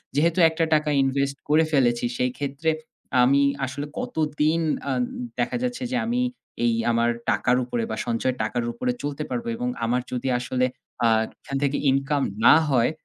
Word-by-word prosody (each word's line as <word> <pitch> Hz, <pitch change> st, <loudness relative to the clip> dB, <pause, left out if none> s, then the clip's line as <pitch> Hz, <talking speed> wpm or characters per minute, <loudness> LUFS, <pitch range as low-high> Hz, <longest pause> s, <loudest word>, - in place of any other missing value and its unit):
যেহেতু 165 Hz, +4 st, +2 dB
একটা 160 Hz, +1 st, -1 dB
টাকা 150 Hz, 0 st, +2 dB
ইনভেস্ট 140 Hz, +1 st, 0 dB
করে 155 Hz, +2 st, +5 dB
ফেলেছি, 120 Hz, -4 st, +2 dB
সেইক্ষেত্রে 140 Hz, +5 st, -1 dB, 0.5 s
আমি 140 Hz, +3 st, +4 dB, 0.2 s
আসলে 135 Hz, +3 st, -5 dB
কতদিন 155 Hz, +1 st, 0 dB, 0.3 s
আন 250 Hz, -, 0 dB, 0.4 s
দেখা -, -, 0 dB
যাচ্ছে 250 Hz, +1 st, -2 dB
যে -, -, 0 dB
আমি 245 Hz, +2 st, 0 dB, 0.4 s
এই 115 Hz, -, +3 dB, 0.2 s
আমার 115 Hz, 0 st, +2 dB, 0.2 s
টাকার 125 Hz, 0 st, +2 dB
উপরে 120 Hz, -2 st, -2 dB
বা -, -, -1 dB
সঞ্চয়ের 125 Hz, +2 st, -1 dB
টাকার 120 Hz, +2 st, -1 dB
উপরে 255 Hz, -, -1 dB
চলতে 145 Hz, +1 st, -3 dB
পারবো 235 Hz, -1 st, -3 dB
এবং 245 Hz, +1 st, -2 dB, 0.2 s
আমার 125 Hz, +2 st, +1 dB
যদি 125 Hz, +1 st, -3 dB
আসলে 125 Hz, +1 st, 0 dB, 0.4 s
আ -, -, +6 dB, 0.3 s
এখান 135 Hz, -, -4 dB
থেকে 140 Hz, 0 st, +1 dB
ইনকাম 135 Hz, +2 st, +1 dB, 0.3 s
না -, -, +9 dB, 0.2 s
হয়, 120 Hz, -1 st, +3 dB
140 Hz, 160 wpm, -24 LUFS, 125-155 Hz, 0.5 s, না